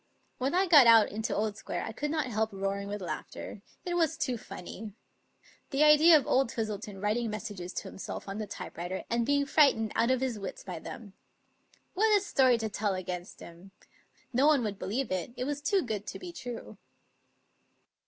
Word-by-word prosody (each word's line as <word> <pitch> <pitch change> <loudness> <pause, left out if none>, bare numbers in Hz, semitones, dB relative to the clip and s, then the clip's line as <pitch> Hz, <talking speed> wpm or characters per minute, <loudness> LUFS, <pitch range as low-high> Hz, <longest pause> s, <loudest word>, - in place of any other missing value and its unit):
When 265 +6 0
I 375 +2 +4
got 300 -9 +8
out 225 -2 +7
into 220 +3 -3
Old 210 0 -1
Square - - -4
I - - -5
could 295 +7 -3
not 310 -2 0
help 220 -2 -1
roaring 195 0 -3
with 205 -1 -5
laughter. 175 - -6 0.2
It 355 - -2
was 325 -2 +1
too 255 -3 -1
funny. 210 -1 -8 0.8
The 280 +1 +2
idea 305 +2 +8
of 285 - -2
old 265 -2 +2
Twistleton 210 -3 -4
writing 220 +3 0
messages 205 -4 -5
to - - -4
himself 190 - -7
on 195 +2 -5
the 215 - -4
type 200 - -8
writer, 175 +2 -4
and 235 0 +1
being 285 0 +2
frightened 275 -7 +3
out 235 - +2
of 260 -1 +3
his 250 -5 -1
wits 195 -2 -7
by 180 -4 -6
them. 200 +3 -9 0.8
What 425 +2 +4
a - - -1
story 260 - +3
to 225 -1 -2
tell 205 -1 -1
against 180 -1 -6
him! 175 +3 -13 0.6
No 265 +4 +4
one 295 -5 +4
would 205 -3 -3
believe 245 +6 -2
it; 185 +6 -2
it - - -2
was 285 +2 -3
too 370 +6 +2
good 215 -5 -4
to - - -5
be 360 -1 -8
true. 240 - -8
225 Hz, 195 wpm, -30 LUFS, 200-280 Hz, 0.8 s, got